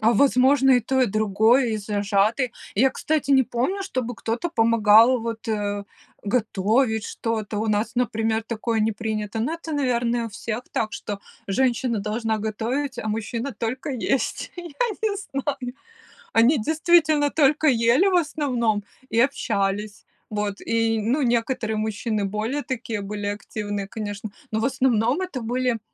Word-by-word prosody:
А 225 +2 +4
возможно 265 +2 +4
и 250 - +5
то, 260 +3 0
и 255 - +4
другое, 220 +4 +3
и 220 - 0
зажаты. 210 +4 +1 0.2
Я, 265 +6 +4
кстати, 305 -1 -1
не 265 -1 +6
помню, 260 +12 -1
чтобы 255 -9 -3
кто-то 230 +8 -2
помогал 230 -1 +5
вот, 225 -1 -5
э, 205 -1 -2 0.4
готовить 220 +1 +1
что-то. 220 -2 -3
У 220 - -1
нас, 210 +1 0
например, 225 -2 0
такое 225 0 -2
не 220 +1 +2
принято, 215 -1 -3
но 255 +9 -1
это, 330 -1 -7
наверное, 240 -4 0
у - - -6
всех 225 +2 -5
так, 215 -1 -1
что 205 -1 -5 0.3
женщина 240 +2 +1
должна 220 +2 -1
готовить, 235 +6 -2
а 215 - -3
мужчина 230 +5 -3
только 240 +6 -3
есть. 260 +1 -1
Я 350 - -7 0.4
не 425 -2 +1
знаю. 275 -8 -4 0.6
Они 235 +6 +5
действительно 310 +2 +3
только 305 +1 +3
ели, 245 +7 +4
в 375 - +2
основном 245 - 0 0.3
и 230 - +1
общались. 205 -5 0 0.2
Вот. 210 -1 -3
И, 225 -1 +1
ну 250 +8 +1
некоторые 235 -2 0
мужчины 215 0 -1
более 220 +8 -2
такие 230 -4 -4
были 205 +1 -5
активные, 205 -1 -4
конечно, 210 0 -5 0.2
но 220 - 0
в 225 - 0
основном 255 - +2
это 365 -9 -4
были 245 0 0
230 Hz, 150 wpm, -24 LUFS, 215-260 Hz, 0.6 s, не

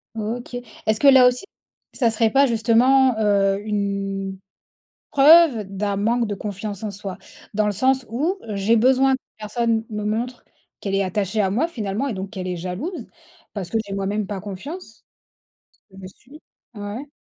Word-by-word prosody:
OK. 230 +3 -5 0.3
Est-ce 215 0 +1
que 285 - +4
là 260 -2 +8
aussi, 250 +5 0 0.5
ça 235 -4 +2
serait 225 0 +2
pas 275 +5 +4
justement, 250 +2 +3
heu, 200 -2 +2
une 195 -2 -2 0.7
preuve 285 -5 +6
d'un 200 +1 -3
manque 230 +4 +1
de 205 - -2
confiance 205 0 -6
en 210 - -2
soi? 195 -1 -7 0.4
Dans 215 +1 +1
le 210 - +1
sens 260 +5 +1
où, 305 - -1
j'ai 205 +3 +2
besoin 265 +3 +4
que 260 - -2 0.2
personne 225 +1 -1
me 210 -1 -4
montre 235 +4 -3 0.4
qu'elle 195 -1 -3
est 195 - +2
attachée 195 +2 -1
à 190 - +2
moi 245 +12 +1
finalement, 225 -4 -3
et 255 - -2
donc 190 0 -6
qu'elle 185 -4 -6
est 180 -1 -3
jalouse, 185 - -5 0.5
parce 190 -5 -5
que 225 - +1
j'ai 200 - -8
moi-même 200 +1 -2
pas 200 -2 -4
confiance? 260 - -9 0.9
Tu 190 - -17
me 190 -1 -9
suis? 275 - -17 0.3
Ouais. 210 +6 -6
215 Hz, 170 wpm, -22 LUFS, 200-250 Hz, 0.9 s, là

